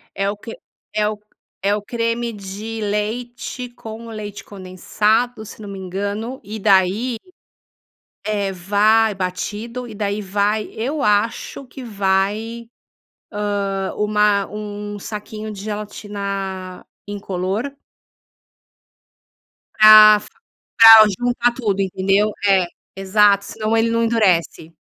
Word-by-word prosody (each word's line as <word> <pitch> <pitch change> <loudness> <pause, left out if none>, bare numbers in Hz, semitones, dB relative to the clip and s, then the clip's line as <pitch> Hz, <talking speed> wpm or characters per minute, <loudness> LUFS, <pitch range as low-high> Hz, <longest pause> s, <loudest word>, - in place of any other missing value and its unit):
É 195 0 0
o 205 - -4
que 225 +2 -9 0.4
é 210 0 +1
o 215 0 -3 0.5
é 200 +1 +2
o 210 - -4
creme 230 +2 -2
de 210 +2 -7
leite 235 +4 -4
com 230 -1 -10
o - - -9
leite 205 -2 -7
condensado, 210 +5 -1
se 215 - -11
não 205 - -8
me 200 - -7
engano. 200 +7 -4
E 215 +2 -7
daí 200 +4 +2 1.1
é, 205 -2 -1
vai 210 +4 +2
batido 210 +6 -4
e 225 - -9
daí 205 0 -2
vai 205 +2 0
eu 275 +7 -3
acho 210 +6 0
que 255 +2 -10
vai, 210 +2 -1 1.0
ah, 195 -1 -3
uma 210 -1 +2
um 205 0 -6
saquinho 215 +1 -7
de 200 - -9
gelatina 200 -3 -5 0.2
incolor. 200 +5 -3 2.0
Pra 215 -1 +9 0.6
pra 225 -1 +10
juntar 245 0 +1
tudo, 210 -5 -1
entendeu? 195 +2 +1 0.2
É 190 -2 +4 0.3
exato, 200 +1 +3
senão 215 +2 -2
ele 225 0 +2
não 230 0 +1
endurece. 185 -8 +1
210 Hz, 115 wpm, -20 LUFS, 200-225 Hz, 2.0 s, pra